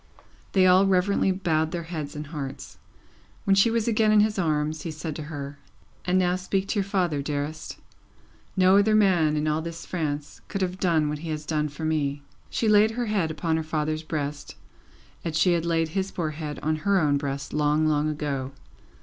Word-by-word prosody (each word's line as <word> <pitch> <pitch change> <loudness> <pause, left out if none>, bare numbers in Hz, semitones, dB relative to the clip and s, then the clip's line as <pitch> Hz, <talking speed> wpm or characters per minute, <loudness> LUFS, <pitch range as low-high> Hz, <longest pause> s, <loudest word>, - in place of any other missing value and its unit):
They 190 -2 +5
all 185 +2 +6
reverently 190 +1 +2
bowed 160 -4 0
their 170 0 -4
heads 155 -4 -6
and 150 +1 -5
hearts. 145 -3 -7 0.6
When 195 - +3
she 195 +4 +5
was 230 -1 0
again 220 -1 +3
in 215 -1 +6
his 210 -1 +1
arms, 155 -2 0
he 170 - -5
said 155 0 -5
to - - -5
her: 140 -2 -6 0.5
"And 180 +1 +2
now 180 -1 +2
speak 190 +1 -2
to 210 - 0
your - - +2
father, 180 -7 0
dearest. 145 +2 -4 0.8
No 185 +1 +6
other 215 +1 +3
man 175 -7 +3
in 150 +1 0
all 155 +1 +1
this 170 0 -7
France 150 -4 -4
could 195 -1 -2
have 185 0 -3
done 165 -5 +2
what 150 0 -3
he 165 +1 -6
has 155 -1 -4
done 150 -1 0
for 145 +3 -6
me." 145 -2 -1 0.3
She 225 - -1
laid 210 0 +6
her 245 - 0
head 205 -7 0
upon 160 +1 -1
her 160 - -2
father's 155 0 -2
breast, 150 -2 -4 0.7
as 160 -2 -2
she 175 +3 +4
had 170 0 0
laid 165 -1 +1
his 190 +3 -2
poor 160 -5 -3
head 150 -1 -5
on 155 0 +1
her 195 +5 +2
own 145 -4 +2
breast, 140 0 -4
long, 150 +1 +2
long 155 0 +2
ago. 140 -3 -3
160 Hz, 200 wpm, -26 LUFS, 150-185 Hz, 0.8 s, all